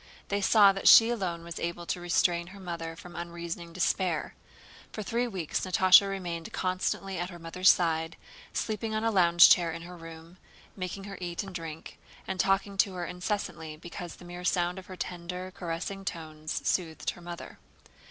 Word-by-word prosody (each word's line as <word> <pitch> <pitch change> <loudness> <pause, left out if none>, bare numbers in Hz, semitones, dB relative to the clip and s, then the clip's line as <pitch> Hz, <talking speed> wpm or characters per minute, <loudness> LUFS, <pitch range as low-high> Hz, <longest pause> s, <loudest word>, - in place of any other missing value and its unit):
They 200 0 0
saw 200 0 +7
that 195 - -1
she 225 +1 +9
alone 180 -7 -2
was 170 -1 -7
able 170 0 -3
to 175 +2 -3
restrain 175 0 +1
her 200 +2 -12
mother 170 -3 -5
from 175 +1 -12
unreasoning 170 0 -6
despair. 175 -1 0 0.6
For 215 - -5
three 235 +4 0
weeks 185 -9 -2
Natásha 185 +1 +6
remained 175 -4 -4
constantly 185 +1 -2
at 175 +1 -2
her 175 - -9
mother's 175 +3 +2
side, 165 -1 +2 0.3
sleeping 220 0 -2
on 215 - -1
a 225 - +2
lounge 175 -3 +7
chair 170 -2 +5
in 165 +1 -7
her 180 +1 -9
room, 165 +1 -11 0.4
making 185 +1 -5
her 195 0 -8
eat 175 +2 -3
and 195 -1 -9
drink, 165 -2 -7 0.3
and 190 - -3
talking 195 +1 +1
to 195 0 +3
her 175 -1 -3
incessantly 180 -4 -4
because 175 +1 -8
the 180 - -14
mere 175 0 -8
sound 180 0 +1
of 185 - -13
her 185 - -8
tender, 180 +1 -5
caressing 180 +3 -4
tones 155 -3 -5
soothed 165 -4 0
her 175 - -14
mother. 175 0 -9
175 Hz, 180 wpm, -29 LUFS, 170-190 Hz, 0.6 s, she